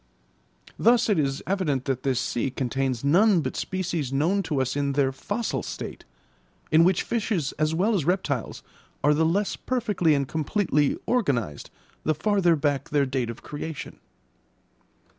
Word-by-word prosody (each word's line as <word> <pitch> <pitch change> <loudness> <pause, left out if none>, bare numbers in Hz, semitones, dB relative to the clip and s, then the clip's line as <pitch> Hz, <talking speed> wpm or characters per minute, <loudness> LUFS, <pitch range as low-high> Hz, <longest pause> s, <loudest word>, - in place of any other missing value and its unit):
Thus 235 0 +4
it 205 - +3
is 135 -2 -1
evident 160 -10 -1
that 130 -2 -1
this 130 -3 0
sea 125 +1 -1
contains 130 -1 -2
none 180 +5 +4
but - - -4
species 170 -7 -2
known 165 +9 +1
to 155 -7 -2
us 130 0 -1
in 140 -1 0
their 135 -1 +2
fossil 205 - -3
state, - - -7 0.7
in 160 +1 +6
which 180 0 +3
fishes 210 - -1
as 155 +1 +1
well 200 +7 +2
as 190 -7 +1
reptiles 150 - -1 0.4
are 150 - +5
the 160 +2 +2
less 195 +5 0
perfectly 210 -11 +1
and 140 -1 0
completely 155 -2 0
organised 130 - 0 0.3
the 155 - +1
farther 195 -2 +2
back 145 -2 -1
their 145 -2 +2
date 130 -3 -2
of 115 - -8
creation. 150 +1 -7
155 Hz, 155 wpm, -25 LUFS, 135-190 Hz, 0.7 s, in